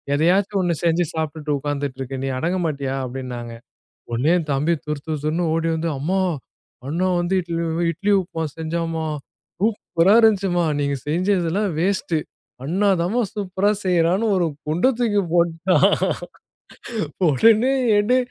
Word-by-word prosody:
ஏதையாச்சும் 190 +6 +2
ஒண்ணு 175 -2 +1
செஞ்சு 170 +1 +2
சாப்பிட்டுட்டு 155 -1 -2
உக்காந்துட்டு 145 -2 -3
இருக்க, 135 +1 -5
நீ - - -1
அடங்க 180 +4 0
மாட்டியா?" 140 -3 -2
அப்படின்னாங்க. 125 -2 -6 0.6
உடனே 125 +7 +1
என் 155 -2 -6
தம்பி 150 +5 +1
துறுதுறுன்னு 155 +2 -2
ஓடி 165 0 0
வந்து, 165 +1 -1
அம்மா 185 +7 0 0.7
அண்ண 165 +5 -2 0.2
வந்து 175 +2 -1
இட்லி 170 -1 -3
உ - - -2 0.2
இட்லி 200 +6 -1
உப்புமா 165 -2 -5
செஞ்சாம்மா. 160 0 -2 0.5
சூப்பரா 200 -3 +2
இருந்துச்சும்மா. 195 -6 +3 0.2
நீங்க 140 0 0
செய்ஞ்சதெல்லாம் 185 +3 +1
வேஸ்ட். 185 -2 0 0.5
அண்ணாதாம்மா 190 - +1
சூப்பரா 200 -1 0
செய்யறான்னு 180 +3 +2
ஒரு 175 -2 +2 0.2
குண்டை 175 +12 +2
தூக்கி 210 -4 +2
போட்டான். 170 +2 +3 1.4
உடனே 225 - +4 0.2
ஏண்டி 215 +5 +3
170 Hz, 125 wpm, -22 LUFS, 155-190 Hz, 1.4 s, உடனே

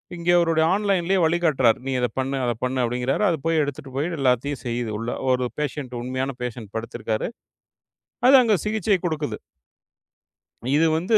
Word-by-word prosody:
இங்க 170 0 -4
அவருடைய 165 -2 +3
ஆன்லைன்லயே 195 -2 +1
வலி 165 +1 +3
காட்டுறார். 135 -8 +3
நீ 135 - -2
இத 125 - +2
பண்ணு, 135 +1 -1
அத 120 - +1
பண்ணு 130 +1 -1
அப்பிடிங்கிறாரு. 125 - 0
அத 170 - +2
போய் 165 -1 +3
எடுத்துட்டு 145 0 -6
போய் 145 +4 0
எல்லாத்தையும் 135 +1 +1
செய்யுது 120 -2 -2
உள்ள 115 +2 -4 0.2
ஒரு 125 0 +1
பேஷண்ட் 140 -4 -3
உண்மையான 130 +2 -3
பேஷண்ட் 115 -4 -6
படுத்திருக்காரு. 115 -1 -3 1.0
அது 275 - +9
அங்க 220 -4 +3
சிகிச்சை 210 -1 +1
கொடுக்குது. 150 -9 -2 1.4
இது 165 +1 +4
வந்து 185 +7 +3
140 Hz, 155 wpm, -23 LUFS, 125-165 Hz, 1.4 s, அது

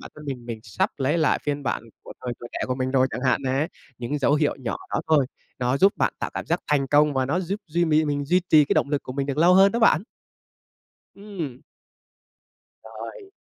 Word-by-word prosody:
bản - - -10
thân 150 - -11
mình, 125 -4 -5
mình 115 -2 -5
sắp 105 - -1
lấy 140 +5 +1
lại 155 - +2
phiên 145 -1 -2
bản 105 - -2 0.2
của - - -10
thời 125 - -2
tuổi 120 - -8
trẻ - - -4
của 130 - -1
mình 130 0 -2
rồi 130 -1 +3
chẳng 125 - -4
hạn 130 0 +2
nè, 135 +4 0 0.3
những 125 +5 -3
dấu 140 +1 +3
hiệu 150 -1 +1
nhỏ 120 -3 -3 0.2
đó - - +1
thôi, 150 -5 +4 0.3
nó 125 +1 +1
giúp 195 +7 +5
bạn - - +1
tạo - - -3
cảm - - -4
giác 170 +2 0
thành 140 -2 +1
công 145 +2 +3
và 130 -1 +1
nó 170 +7 0
giúp 195 +4 -3
duy 170 +2 +1
mì 155 -1 +3
mình 145 -1 -1
duy 180 +6 +3
trì 155 -2 +7
cái - - 0
động 140 - +1
lực 145 - 0
của 130 - -7
mình 140 0 -2
được 140 - -3
lâu 175 +3 +6
hơn 195 +1 +6
đó 235 - 0
bạn. 205 -7 +4 1.1
Ừm. 175 -11 -7 1.2
Rồi. 400 -6 -9
145 Hz, 235 wpm, -24 LUFS, 130-165 Hz, 1.2 s, trì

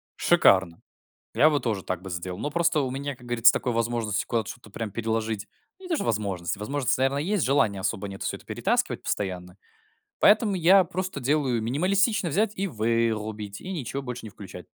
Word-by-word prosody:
Шикарно! 95 -3 +3 0.5
Я 155 - +6
бы 145 -2 +1
тоже 105 -6 -2
так 90 -1 -3
бы 95 - -8
сделал. 90 +1 -5
Но 145 - -3
просто 170 -2 +2
у 130 -2 -2
меня, 140 0 -4
как 125 -1 -16
говорится, 120 -1 +5
такой 125 - -1
возможности 115 -3 -1
куда-то 115 -2 -1
что-то 120 -3 -14
прям 105 0 -5
переложить 110 -1 -2 0.3
ну 380 - -12
не - - -9
то 330 - +2
что - - -2
возможности, 100 -4 -2
возможность, 130 +3 0
наверно, 135 +1 +1
есть, 180 +4 0
желания 115 -7 +2
особо 100 +1 -2
нет 95 0 -9
всё - - -2
это - - -20
перетаскивать - - -1
постоянно. 90 -2 -3 0.6
Поэтому 210 -1 +5
я 185 +2 +6
просто 185 -3 -4
делаю- 130 -4 +1
минималистично 185 - +1
взять 205 +7 +1
и 195 +1 -1
вырубить, 110 - -1
и 190 - -6
ничего 140 -4 -4
больше 125 -3 -6
не - - -7
включать. 100 -1 -11
120 Hz, 190 wpm, -26 LUFS, 105-150 Hz, 0.6 s, Я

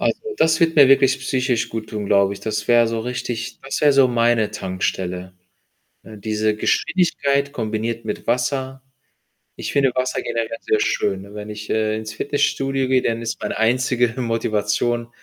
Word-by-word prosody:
Also, - - 0 0.2
das 160 +1 +3
wird 165 -1 +2
mir 140 -2 +9
wirklich 135 0 +4
psychisch 130 -2 0
guttun, 110 -2 -5
glaube 100 0 +3
ich. 100 - -7
Das 110 0 -3
wäre 120 -1 +5
so 115 0 -2
richtig 120 -1 -4
das 135 - -3
wäre 145 -2 +5
so 135 -1 +5
meine 115 -3 +2
Tankstelle, 95 -2 -3 0.7
ne, 110 +6 -12
diese 110 +1 -1
Geschwindigkeit 140 - +1
kombiniert 115 -2 -3
mit 105 - -5
Wasser. 130 +2 -1 0.8
Ich - - -5
finde 135 -2 +3
Wasser 130 0 -1
generell 115 +4 -3
sehr 435 -1 +1
schön, 95 - 0
ne? 100 +1 -13
Wenn 105 0 -7
ich, 105 0 -8
äh, 110 0 0
ins 110 -1 -6
Fitnessstudio 135 0 0
gehe, 130 -1 +3
dann 115 0 -1
ist 115 -1 -4
meine 105 - -3
einzige 125 0 +2
Motivation 115 0 -1
115 Hz, 165 wpm, -21 LUFS, 110-130 Hz, 0.8 s, mir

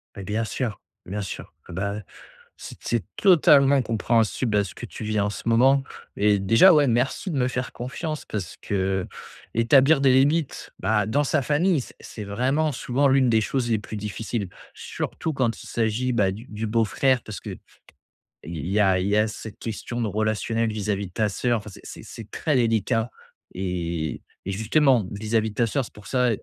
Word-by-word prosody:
Mais 100 - -7
bien 105 +4 -1
sûr, 110 -1 -3 0.3
bien 100 +3 -4
sûr, 95 - -7 0.2
et - - -8
bah, 100 +3 -2
ouais 105 - -7 0.6
c - - -8
c'est 115 -3 -1
totalement 140 -7 +5
compréhensible 115 0 +1
à 100 - +2
ce 90 - -9
que - - -7
tu - - -8
vis 110 -1 0
en 100 - +1
ce 105 - -7
moment 130 +4 +5 0.4
et 105 0 +3
déjà, 115 - +6
ouais, 145 -2 +4
merci 125 - 0
de 145 - -2
me 125 - +2
faire 125 0 -3
confiance 150 +5 -5
parce 95 -6 -5
que, - - -6
heu, 95 -1 0 0.5
établir 135 +5 +5
des 135 - +5
limites, 145 +3 +1
bah 105 -2 +1
dans 140 +8 +1
sa 145 +1 +1
famille, 150 +4 +2
c - - -12
c'est 105 - -8
vraiment 135 +9 0
souvent 135 +4 +1
l'une 135 -2 +4
des 110 - +4
choses 120 +2 -1
les 110 - +2
plus 110 - -8
difficiles, 105 0 -4 0.2
surtout 160 - -4
quand 125 -4 -1
il - - -11
s'agit, 115 +3 0
bah, 100 -6 +2
du 110 +6 -9
du 110 +1 -4
beau-frère 115 +3 +2
parce 110 - -7
que - - -7 0.9
il 85 -1 -5
y 100 +3 +1
a 95 -3 +4
il 95 - -1
y 105 +1 +2
a 105 +1 +3
cette 110 -1 -8
question 120 +2 -4
de 115 - 0
relationnel 110 +2 0
vis-à-vis 100 -2 -2
de 90 - -17
ta 110 +1 +1
sœur. 120 +4 0
Enfin, 110 - -10
c'est - - -9
c'est 110 -2 -10
très 150 -4 -1
délicat 115 0 +1 0.4
et 85 -4 -3 0.2
et 100 - -2
justement 120 +2 +3
vis-à-vis 110 +2 0
de 105 - -12
ta 120 -1 +2
sœur, 135 +4 0
c'est - - -14
pour 105 -3 -13
ça 125 -1 +2
115 Hz, 200 wpm, -24 LUFS, 105-130 Hz, 0.9 s, déjà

